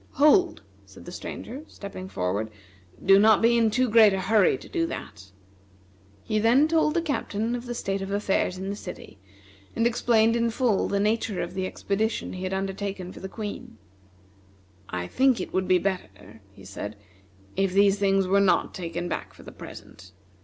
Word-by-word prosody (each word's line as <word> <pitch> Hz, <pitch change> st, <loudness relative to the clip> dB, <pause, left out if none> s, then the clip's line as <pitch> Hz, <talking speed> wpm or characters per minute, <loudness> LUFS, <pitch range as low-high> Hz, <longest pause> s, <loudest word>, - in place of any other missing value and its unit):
"Hold!" 305 Hz, +6 st, +4 dB, 0.2 s
said -, -, -15 dB
the -, -, -8 dB
Stranger, 260 Hz, +5 st, -7 dB
stepping 190 Hz, -2 st, -9 dB
forward; 100 Hz, -, -2 dB, 0.6 s
"do 195 Hz, +1 st, +7 dB
not 215 Hz, 0 st, +6 dB
be 235 Hz, +1 st, +4 dB
in 230 Hz, -1 st, +3 dB
too 250 Hz, +4 st, +1 dB
great 215 Hz, -2 st, +6 dB
a 190 Hz, -, -1 dB
hurry 205 Hz, +1 st, +3 dB
to -, -, -13 dB
do 330 Hz, -1 st, -1 dB
that." 100 Hz, -, -8 dB, 0.9 s
He 215 Hz, -, 0 dB
then 245 Hz, +7 st, +4 dB
told 315 Hz, -1 st, +2 dB
the 335 Hz, -, +1 dB
Captain 235 Hz, -7 st, -2 dB
of 245 Hz, 0 st, -5 dB
the 240 Hz, -, -4 dB
state 195 Hz, -3 st, -2 dB
of 195 Hz, -, -5 dB
affairs 200 Hz, -2 st, 0 dB
in 190 Hz, +1 st, -4 dB
the -, -, -4 dB
city, 110 Hz, -, -10 dB, 0.6 s
and 230 Hz, -, +1 dB
explained 230 Hz, -1 st, +3 dB
in 235 Hz, 0 st, +1 dB
full 230 Hz, -3 st, +1 dB
the 200 Hz, -, 0 dB
nature 210 Hz, -2 st, 0 dB
of 170 Hz, -, -7 dB
the 190 Hz, 0 st, -2 dB
expedition 215 Hz, +4 st, -2 dB
he 185 Hz, 0 st, -6 dB
had 185 Hz, -, -3 dB
undertaken 195 Hz, -1 st, -4 dB
for -, -, -11 dB
the 190 Hz, -, -7 dB
Queen. 210 Hz, -, -7 dB, 1.1 s
"I 90 Hz, -1 st, -3 dB
think 260 Hz, -, +2 dB
it -, -, -6 dB
would 185 Hz, 0 st, 0 dB
be 185 Hz, -, +5 dB
better," 110 Hz, -, -5 dB
he 95 Hz, -1 st, -16 dB
said, 100 Hz, +2 st, -7 dB, 0.6 s
"if 195 Hz, -1 st, +1 dB
these 200 Hz, +1 st, +4 dB
things 195 Hz, -1 st, +2 dB
were 195 Hz, +2 st, +3 dB
not 195 Hz, -, +2 dB
taken 170 Hz, -1 st, -4 dB
back -, -, -5 dB
for -, -, -15 dB
the -, -, -10 dB
present. 95 Hz, -1 st, -12 dB
200 Hz, 185 wpm, -26 LUFS, 185-230 Hz, 1.1 s, do